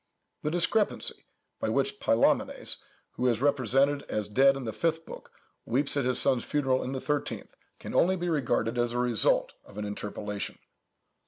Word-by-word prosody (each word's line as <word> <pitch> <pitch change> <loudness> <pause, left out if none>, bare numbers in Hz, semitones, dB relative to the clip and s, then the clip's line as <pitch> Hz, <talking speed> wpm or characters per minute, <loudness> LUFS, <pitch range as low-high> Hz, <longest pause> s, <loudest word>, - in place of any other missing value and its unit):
The 150 - -1
discrepancy, 175 +6 0 0.3
by - - -1
which - - 0
Pylæmenes, - - +2 0.3
who 125 - -1
is 115 -3 +2
represented 140 +1 +2
as 105 -1 -2
dead 135 +6 +4
in 135 - -6
the 110 -2 -4
fifth 165 +7 -1
book, - - -10 0.3
weeps 140 +5 +1
at 140 -3 +1
his 125 -1 +2
son's 125 -3 +2
funeral 135 -3 +1
in 130 - -4
the 135 - -2
thirteenth, 145 +1 -3 0.3
can - - -7
only 185 +2 +4
be 175 -1 -3
regarded 125 -6 0
as 120 0 0
the - - -2
result 120 -5 +2
of 105 - -15
an 105 - -3
interpolation. 105 0 -5
130 Hz, 170 wpm, -28 LUFS, 115-145 Hz, 0.3 s, dead